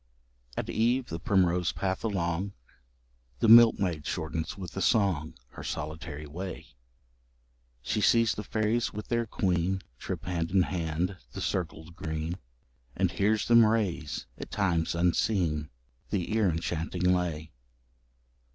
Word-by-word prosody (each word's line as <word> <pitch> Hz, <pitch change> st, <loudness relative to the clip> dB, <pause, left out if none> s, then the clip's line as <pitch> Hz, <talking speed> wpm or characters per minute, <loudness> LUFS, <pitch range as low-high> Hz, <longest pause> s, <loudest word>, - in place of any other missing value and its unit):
At -, -, -2 dB
eve, 120 Hz, +3 st, +1 dB
the 80 Hz, -, -4 dB
primrose 90 Hz, -2 st, +2 dB
path 95 Hz, -1 st, -2 dB
along, 95 Hz, -2 st, -1 dB, 0.8 s
The -, -, +1 dB
milkmaid 110 Hz, -8 st, +7 dB
shortens 80 Hz, +4 st, -3 dB
with 90 Hz, -5 st, -7 dB
a 95 Hz, -, -2 dB
song 95 Hz, -10 st, +2 dB
Her -, -, -10 dB
solitary 75 Hz, 0 st, -5 dB
way; 90 Hz, +6 st, -7 dB, 1.1 s
She 105 Hz, -, -1 dB
sees 115 Hz, +2 st, +4 dB
the 105 Hz, -, -5 dB
fairies 110 Hz, +3 st, 0 dB
with 105 Hz, 0 st, -7 dB
their 115 Hz, -1 st, 0 dB
queen 95 Hz, -1 st, 0 dB, 0.2 s
Trip -, -, -5 dB
hand 85 Hz, -2 st, -1 dB
in 95 Hz, -1 st, +4 dB
hand 85 Hz, +1 st, -2 dB, 0.2 s
the -, -, -5 dB
circled 85 Hz, -2 st, -3 dB
green, 80 Hz, 0 st, -4 dB, 0.6 s
And 95 Hz, -2 st, +1 dB
hears 105 Hz, +2 st, +1 dB
them 115 Hz, -1 st, +7 dB
raise, 100 Hz, -9 st, 0 dB
at -, -, -7 dB
times 85 Hz, -5 st, 0 dB
unseen, 85 Hz, -3 st, +1 dB, 0.4 s
The 95 Hz, +2 st, -1 dB
ear 110 Hz, -4 st, +3 dB
enchanting 85 Hz, +1 st, -2 dB
lay. 90 Hz, -4 st, +1 dB
90 Hz, 130 wpm, -29 LUFS, 80-105 Hz, 1.1 s, milkmaid